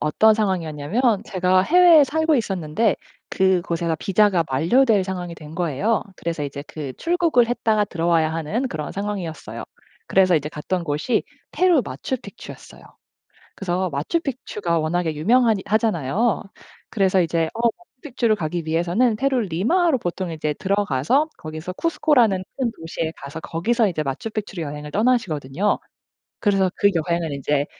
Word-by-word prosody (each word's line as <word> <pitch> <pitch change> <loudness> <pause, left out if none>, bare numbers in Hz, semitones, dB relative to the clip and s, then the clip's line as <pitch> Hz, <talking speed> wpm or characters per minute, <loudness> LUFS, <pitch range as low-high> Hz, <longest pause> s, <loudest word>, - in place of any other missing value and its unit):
어떤 215 +9 +4
상황이었냐면 185 - -1 0.2
제가 185 0 +2
해외에 340 - +6
살고 315 +2 +1
있었는데 195 - 0 0.3
그곳에서 170 -3 +1
비자가 195 -2 +3
만료될 200 - +3
상황이 180 -2 -5
된 155 -1 -11
거예요. 175 - 0
그래서 165 -3 -3
이제 140 0 -5
그 140 -4 -7
출국을 335 -8 +2
했다가 220 -3 +1
들어와야 165 -3 +1
하는 165 - -2
그런 155 -8 -5
상황이었어요. 195 -6 -5 0.4
그래서 185 -2 +4
이제 150 -2 0
갔던 170 +4 -3
곳이 160 +10 0 0.3
페루 355 -7 +3
마추픽추였어요. 235 -4 -7 0.7
그래서 185 -1 -1
마추픽추가 205 - -2
워낙에 160 0 -1
유명하니 220 +4 +3
하잖아요. 215 - +1 0.5
그래서 190 -2 +2
이제 165 -1 0
어 230 - -5 0.4
마추픽추를 240 -5 0
가기 170 -1 -3
위해서는 175 +9 +1
페루를 260 -2 0
리마로 280 - +2
보통 180 -2 -4
이제 155 -2 -2
들어가서 200 - +1
거기서 155 +3 -6
쿠스코라는 245 - +2
큰 255 -3 0
도시에 165 0 -4
가서 140 +4 -8
거기서 215 +8 0
이제 155 -4 -2
마추픽추로 195 +6 -4
여행을 150 0 -6
떠나시거든요. 205 - 0 0.7
그래서 195 -2 +3
그 200 - +4
여행은 170 -1 -1
인제 140 +1 0
185 Hz, 370 characters per minute, -22 LUFS, 160-225 Hz, 0.7 s, 해외에